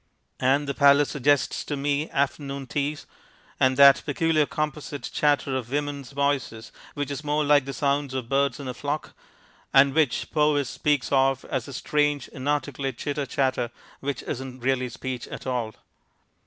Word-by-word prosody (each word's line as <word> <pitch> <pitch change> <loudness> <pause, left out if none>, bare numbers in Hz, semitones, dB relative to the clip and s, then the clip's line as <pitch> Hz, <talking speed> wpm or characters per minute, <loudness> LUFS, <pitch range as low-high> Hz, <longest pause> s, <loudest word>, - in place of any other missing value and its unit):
And 135 +3 +2
the 140 - -1
Palace 140 0 +5
suggests 145 0 +1
to 145 - -3
me 145 +2 -1
afternoon 140 0 -2
teas, 145 +3 -3 0.5
and 130 0 +3
that 140 -1 +8
peculiar 155 0 +1
composite 150 -1 -4
chatter 145 -2 +1
of 125 -3 -3
women's 145 -2 -3
voices 140 -5 -2 0.2
which 145 -1 -3
is 140 +1 -5
more 150 +1 +1
like 145 -2 +4
the 135 - -4
sound 140 0 0
of 130 -3 -3
birds 140 0 +1
in 140 - -6
a 125 - -3
flock, 145 +4 -4 0.6
and 135 0 +6
which 150 -6 +1
Powys 150 -3 +2
speaks 145 -3 0
of 135 -1 +2
as 130 -4 -2
a 140 - -8
strange 145 0 0
inarticulate 140 -1 -2
chitter 145 -1 -3
chatter 130 -3 0 0.3
which 140 -2 -4
isn't 130 0 -6
really 130 -1 +1
speech 125 0 -5
at - - -8
all. 120 -4 -2
140 Hz, 160 wpm, -25 LUFS, 130-145 Hz, 0.6 s, that